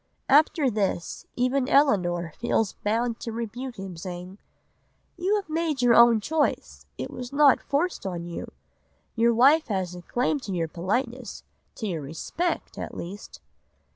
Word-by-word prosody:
'" - - -46
After 300 -4 -1
this 195 -5 -2
even 255 +2 +1
Elinor 175 - +2
feels 225 -3 +1
bound 230 +2 -1
to 230 - -5
rebuke 235 +3 -5
him, 190 -2 -7
saying: 180 +3 -8 0.8
"'You 370 +4 +1
have 410 -2 -2
made 315 -4 -1
your 240 -1 +6
own 235 -1 +7
choice. 205 - -1
It - - -5
was 250 0 -7
not 285 -1 +5
forced 320 +6 -1
on 175 -2 -4
you. 170 0 -6 0.6
Your 235 0 +3
wife 285 +7 +5
has 190 -5 -2
a 180 - -8
claim 250 - 0
to 210 -7 -6
your 165 -2 0
politeness, 230 - -3 0.3
to 220 - -5
your 170 -6 -2
respect, 165 - -3
at - - -6
least. 195 +5 -8
230 Hz, 155 wpm, -26 LUFS, 185-275 Hz, 0.8 s, own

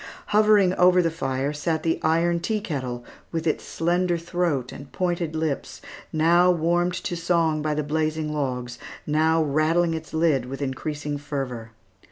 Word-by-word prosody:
Hovering 210 -3 +4
over 180 0 +6
the 165 - +1
fire 135 -2 -2
sat 160 +1 -2
the 165 0 0
iron 170 +2 +2
tea 215 +5 -1
kettle, 130 -10 -4 0.3
with 165 -1 -3
its 155 - 0
slender 175 +1 0
throat 165 -6 -1
and 140 0 -10
pointed 175 -3 -2
lips, 155 -3 -3 0.3
now 170 +3 +4
warmed 175 +1 +1
to 175 - -2
song 165 -2 +1
by 150 0 -1
the 150 - -1
blazing 155 +1 -1
logs, 125 -4 -3 0.3
now 160 +2 +2
rattling 160 +3 +2
its 160 0 -6
lid 155 -6 +1
with 135 +1 -6
increasing 145 +1 -3
fervor. 135 -6 -5
160 Hz, 155 wpm, -24 LUFS, 145-170 Hz, 0.3 s, over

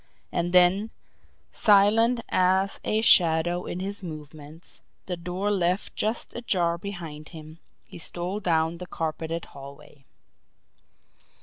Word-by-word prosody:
And 175 0 -1
then, 185 +4 +4 0.6
silent 220 +4 +4
as 190 +2 +2
a 215 +1 0
shadow 175 -3 +4
in 180 - -4
his 200 +2 -4
movements, 155 -1 -10 0.2
the 180 - -3
door 180 +4 -3
left 180 -1 -1
just 220 +2 -2
ajar 175 -8 0
behind 165 -6 -8
him, 155 0 -12 0.3
he - - -12
stole 175 +4 -4
down 165 -3 0
the 180 - -7
carpeted 165 +1 -4
hallway. 140 0 -13
175 Hz, 115 wpm, -26 LUFS, 160-195 Hz, 0.6 s, then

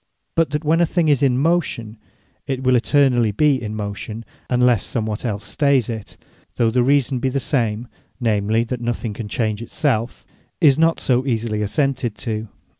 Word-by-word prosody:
But 165 -2 +2
that 150 +2 -3
when 165 +3 +3
a - - +5
thing 165 -1 +1
is 145 -2 +3
in 130 -3 +3
motion, 140 -8 0 0.5
it 130 -1 -3
will 130 -1 +3
eternally 125 -3 +3
be 140 +5 +2
in 110 -1 -5
motion, 105 +2 -5 0.2
unless 125 -3 +3
somewhat 110 -2 -3
els 105 -3 -3
stay 140 -2 +2
it, 115 -3 -4 0.4
though 115 -2 +2
the 125 +2 +2
reason 135 0 +2
be 130 - 0
the 135 +2 -1
same, 120 -4 -1 0.3
(namely, 110 -1 +1
that 120 +1 -5
nothing 120 -2 -3
can 105 +1 -6
change 110 0 -2
it 115 - -8
selfe,) 125 -5 -1 0.3
is 145 -6 +6
not 165 0 +3
so 125 0 +2
easily 115 -3 -1
assented 125 +1 -1
to. 110 -1 -4
120 Hz, 180 wpm, -20 LUFS, 110-140 Hz, 0.5 s, is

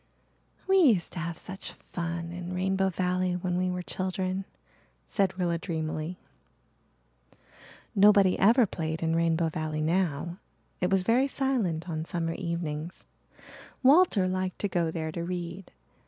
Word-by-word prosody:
"We 385 0 +5
used 235 - +4
to 180 - -5
have 170 -1 -4
such 190 +1 -7 0.2
fun 170 -1 -3
in 175 +1 -6
Rainbow 190 +1 +1
Valley 180 0 0
when 180 0 -2
we 185 +1 +1
were 180 0 -3
children," 185 +1 -2 0.6
said 190 -2 0
Rilla 170 -2 0
dreamily. 160 0 -3 1.8
Nobody 200 -2 +6
ever 230 +5 +6
played 160 -3 -4
in 165 0 +1
Rainbow 165 0 +2
Valley 155 -1 -3
now. 170 0 0 0.4
It 180 - +1
was 195 -1 +2
very 245 +7 +3
silent 235 - -1
on 160 -2 -3
summer 165 -1 -2
evenings. 170 -1 -4 0.8
Walter 270 - +5
liked 185 0 -2
to 205 - +1
go 175 -4 0
there 160 -1 -3
to 170 +2 -4
read. 175 +1 -5
180 Hz, 140 wpm, -28 LUFS, 165-190 Hz, 1.8 s, Nobody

